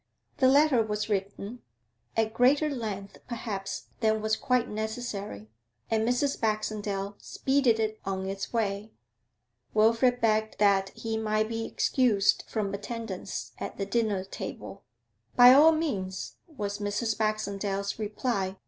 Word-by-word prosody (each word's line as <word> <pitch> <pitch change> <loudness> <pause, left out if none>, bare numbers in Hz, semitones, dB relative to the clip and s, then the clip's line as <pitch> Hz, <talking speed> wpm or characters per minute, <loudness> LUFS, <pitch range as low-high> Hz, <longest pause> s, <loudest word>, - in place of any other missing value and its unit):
The 260 - +4
letter 280 -2 +5
was 210 0 -2
written, 200 +3 -3 0.6
at 220 0 +1
greater 280 +6 +3
length 210 -6 -5
perhaps 215 -5 -5
than 220 -1 +2
was 215 0 +1
quite 250 +1 +1
necessary, 210 - -5 0.4
and 225 +1 +2
Mrs. 275 +3 0
Baxendale 210 -2 -2
speeded 265 -4 +1
it 215 0 -1
on 190 -1 -3
its 195 0 -4
way. 215 -1 -2 0.8
Wilfrid 230 +3 +4
begged 220 -1 +1
that 195 -2 +3
he 225 -1 -3
might 215 0 0
be 225 0 -3
excused 225 -7 +2
from 205 -3 -2
attendance 205 -2 -5
at - - -5
the 195 - -2
dinner 215 -4 0
table. 195 - -8 0.5
'By 245 +1 +9
all 300 +4 +8
means,' 205 - -3
was 210 -10 -4
Mrs. 210 +2 -1
Baxendale's 200 -2 -2
reply. 205 -3 -2
215 Hz, 130 wpm, -28 LUFS, 200-235 Hz, 0.8 s, By